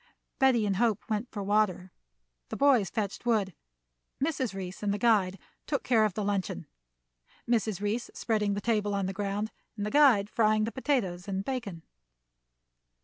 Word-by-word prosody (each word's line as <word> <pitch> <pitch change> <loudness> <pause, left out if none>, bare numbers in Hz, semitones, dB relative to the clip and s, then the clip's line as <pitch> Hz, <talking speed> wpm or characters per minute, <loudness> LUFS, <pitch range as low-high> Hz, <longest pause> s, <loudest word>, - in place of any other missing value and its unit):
Betty 260 -5 +4
and 195 -2 0
Hope 225 -2 +1
went 215 +3 -1
for 205 -2 -5
water. 195 -3 +1 0.6
The - - -5
boys 255 -10 +4
fetched 205 -1 -3
wood. 215 -6 +1 0.7
Mrs. 270 -4 -1
Reece 185 -1 -6
and 205 -1 0
the 205 - 0
guide 205 -5 +2 0.3
took 285 -2 -1
care 225 -3 +3
of 210 - -2
the 215 - -2
luncheon, 200 - -2 0.8
Mrs. 220 -4 0
Reece 215 +4 -2
spreading 210 -3 0
the 205 - -3
table 210 -2 0
on 200 -1 0
the 190 - -3
ground, 205 +2 -2 0.3
and 205 - -2
the 210 - -3
guide 265 -9 +5
frying 215 -1 +2
the 225 - -2
potatoes 210 -11 -1
and 195 0 -3
bacon. 215 -11 -4
210 Hz, 165 wpm, -29 LUFS, 200-235 Hz, 0.8 s, guide